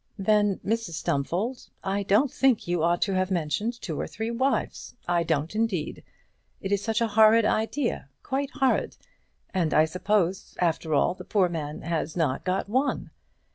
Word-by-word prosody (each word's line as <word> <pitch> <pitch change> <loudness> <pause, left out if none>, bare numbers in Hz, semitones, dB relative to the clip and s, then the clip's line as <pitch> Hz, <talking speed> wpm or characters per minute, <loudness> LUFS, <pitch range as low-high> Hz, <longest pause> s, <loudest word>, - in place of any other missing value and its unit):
"Then, 205 0 +2
Mrs 225 -4 -1
Stumfold, 175 - -2
I 195 +1 -1
don't 210 +8 +3
think 265 -8 +2
you 175 -1 0
ought 170 +1 +2
to 195 - -1
have 185 0 +1
mentioned 190 +7 -1
two 160 -5 -4
or - - -3
three 220 +2 -4
wives. 260 +4 -1
I 175 -1 +2
don't, 160 0 -1
indeed. 215 -8 -2 0.6
It 195 - -5
is 200 -1 +2
such 225 +2 -1
a 230 - +2
horrid 220 +1 +6
idea, 225 - -1
quite 270 +1 -2
horrid! 265 -2 0 0.6
And 175 -5 +1
I 155 - +6
suppose, 185 +2 -1
after 160 -2 +1
all, 145 - +3
the - - -10
poor 190 -4 +2
man 150 -3 -5
has 165 0 -2
not 145 -6 0
got 185 +2 -1
one?" 260 +7 0
195 Hz, 170 wpm, -26 LUFS, 170-225 Hz, 0.6 s, horrid